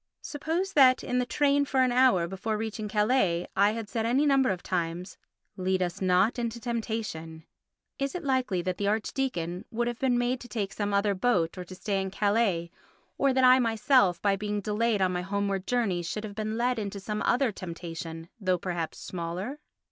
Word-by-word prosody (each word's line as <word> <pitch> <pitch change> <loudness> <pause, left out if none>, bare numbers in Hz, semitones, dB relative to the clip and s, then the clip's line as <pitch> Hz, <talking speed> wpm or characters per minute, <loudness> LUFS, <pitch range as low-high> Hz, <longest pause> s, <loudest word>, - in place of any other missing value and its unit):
Suppose 330 +6 -2
that 260 -3 +6
in 250 0 0
the 250 - -1
train 285 +2 +2
for 270 -2 +2
an 255 - +2
hour 245 -9 +4
before 195 +4 -3
reaching 220 0 -4
Calais 210 -5 +2
I 200 +2 +4
had 225 -2 -5
said 225 +2 -2
any 250 +6 +2
number 270 -2 +4
of 185 -3 -2
times, 175 0 -3 0.4
"Lead 185 0 +1
us 175 +1 -4
not 190 +6 +3
into 235 0 -3
temptation," 220 -9 -4 0.5
is 275 +2 -2
it 360 - -4
likely 255 -10 0
that 185 0 -2
the 200 - 0
archdeacon 205 -5 -2
would 240 0 -1
have 240 -1 -3
been 255 -2 +2
made 245 +1 0
to 245 - -10
take 210 -4 -3
some 205 -1 -2
other 200 0 +2
boat 185 -5 +1
or 180 - -6
to 185 - -10
stay 195 0 -1
in 190 - -3
Calais, 200 -4 +1 0.5
or 275 0 +4
that 260 0 +2
I 255 0 +7
myself, 225 - +3
by 200 -1 +3
being 210 +1 -2
delayed 210 0 +1
on 185 - +2
my 180 - -1
homeward 200 0 -2
journey, 225 -8 +1
should 190 +5 -4
have 210 -2 -6
been 215 +1 -3
led 245 0 +1
into 200 -1 -4
some 210 +2 -4
other 250 -1 +2
temptation, 165 -3 -7
though 185 -3 +1
perhaps 170 -2 -4
smaller? 180 - -5
210 Hz, 195 wpm, -28 LUFS, 185-245 Hz, 0.5 s, I